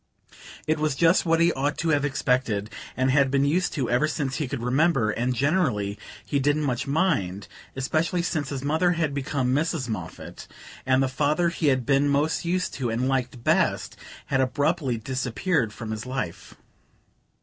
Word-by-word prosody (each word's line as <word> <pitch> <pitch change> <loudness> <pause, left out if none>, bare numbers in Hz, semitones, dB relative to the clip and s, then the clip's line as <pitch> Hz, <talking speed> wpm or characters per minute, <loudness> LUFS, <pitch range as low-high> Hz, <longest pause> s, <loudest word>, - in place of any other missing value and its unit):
It 155 0 0
was 155 -3 0
just 165 +3 +3
what 165 0 +3
he 170 +1 +4
ought 145 +2 -1
to 165 - -1
have 145 -2 +2
expected, 125 -7 0 0.3
and 130 +1 +2
had 140 0 +4
been 140 +1 +2
used 175 +6 +1
to 135 -6 -1
ever 125 +5 +2
since 140 -3 -2
he 150 - -2
could 125 -2 -4
remember; 130 -3 +2
and 125 +3 -1
generally 125 - 0 0.3
he 140 - 0
didn't 145 +2 +1
much 130 -2 -1
mind, 135 - 0 0.3
especially 160 +6 0
since 155 -5 -2
his 135 -2 -4
mother 160 +5 +2
had 160 -4 -1
become 135 -2 -1
Mrs. 150 -2 0
Moffatt, 90 -7 -7 0.4
and 130 0 +4
the - - +1
father 150 +6 +1
he 165 -2 -1
had 130 -3 +2
been 140 0 +3
most 145 +3 +1
used 180 +2 -1
to, 125 -2 -2
and 120 +3 -1
liked 130 -2 -2
best, - - +1 0.3
had 135 -1 +1
abruptly 140 0 0
disappeared 125 - -1
from 110 0 -7
his 110 +2 -5
life. 125 -10 -5
140 Hz, 175 wpm, -25 LUFS, 125-155 Hz, 0.4 s, he